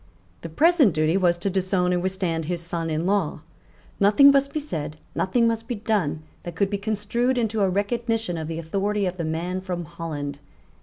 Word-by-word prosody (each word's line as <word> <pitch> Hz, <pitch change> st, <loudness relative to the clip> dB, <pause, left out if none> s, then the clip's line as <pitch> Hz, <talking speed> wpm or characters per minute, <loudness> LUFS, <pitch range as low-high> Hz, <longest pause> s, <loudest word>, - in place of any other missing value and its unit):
The -, -, -6 dB
present 295 Hz, -, +4 dB
duty 155 Hz, +2 st, +2 dB
was 175 Hz, -3 st, +3 dB
to 185 Hz, +3 st, -2 dB
disown 185 Hz, -1 st, +1 dB
and 175 Hz, -, 0 dB
withstand 180 Hz, -4 st, -1 dB
his 175 Hz, +2 st, -2 dB
son 170 Hz, -1 st, -3 dB
in 160 Hz, +2 st, -1 dB
law. 190 Hz, -6 st, 0 dB, 0.6 s
Nothing 215 Hz, +8 st, +7 dB
must 275 Hz, 0 st, +2 dB
be 305 Hz, -, -2 dB
said, 155 Hz, -, -5 dB, 0.2 s
nothing 230 Hz, +5 st, +2 dB
must 225 Hz, 0 st, -1 dB
be 245 Hz, -, -2 dB
done 205 Hz, -8 st, -1 dB, 0.2 s
that 175 Hz, -1 st, -7 dB
could 195 Hz, +2 st, 0 dB
be 200 Hz, -, -1 dB
construed 220 Hz, +5 st, 0 dB
into 225 Hz, -2 st, 0 dB
a 195 Hz, -, +3 dB
recognition 225 Hz, 0 st, -1 dB
of 160 Hz, -1 st, -4 dB
the 165 Hz, 0 st, -4 dB
authority 200 Hz, +5 st, -1 dB
of 180 Hz, 0 st, -3 dB
the 170 Hz, -, -2 dB
man 170 Hz, +4 st, -2 dB
from 180 Hz, -2 st, -4 dB
Holland. 150 Hz, -4 st, -5 dB
185 Hz, 195 wpm, -24 LUFS, 165-215 Hz, 0.6 s, Nothing